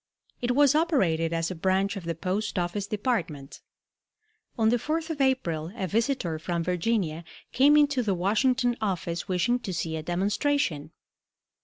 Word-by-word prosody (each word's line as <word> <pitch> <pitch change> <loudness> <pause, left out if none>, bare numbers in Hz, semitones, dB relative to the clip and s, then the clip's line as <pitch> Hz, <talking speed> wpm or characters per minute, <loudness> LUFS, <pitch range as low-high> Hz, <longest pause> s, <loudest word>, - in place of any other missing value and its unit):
It 245 0 0
was 285 -1 +5
operated 190 - +1
as 165 +1 -1
a - - -4
branch 190 +4 0
of 190 -4 -7
the 165 0 -2
Post 195 +5 -2
office 180 +3 -2
Department. 190 - -3 1.0
On 220 -1 +3
the 245 - +3
4th 320 +6 -2
of 295 -3 -3
April 170 -12 0
a 195 - -2
visitor 210 - -1
from 170 +1 -2
Virginia 180 -2 -1 0.3
came 290 +3 +5
into 290 -3 +3
the 205 -5 0
Washington 240 +7 +1
office 175 -4 -2
wishing 210 +7 +1
to 200 - -5
see 165 -2 -3
a 160 - -3
demonstration. 185 - 0
200 Hz, 155 wpm, -27 LUFS, 170-250 Hz, 1.0 s, was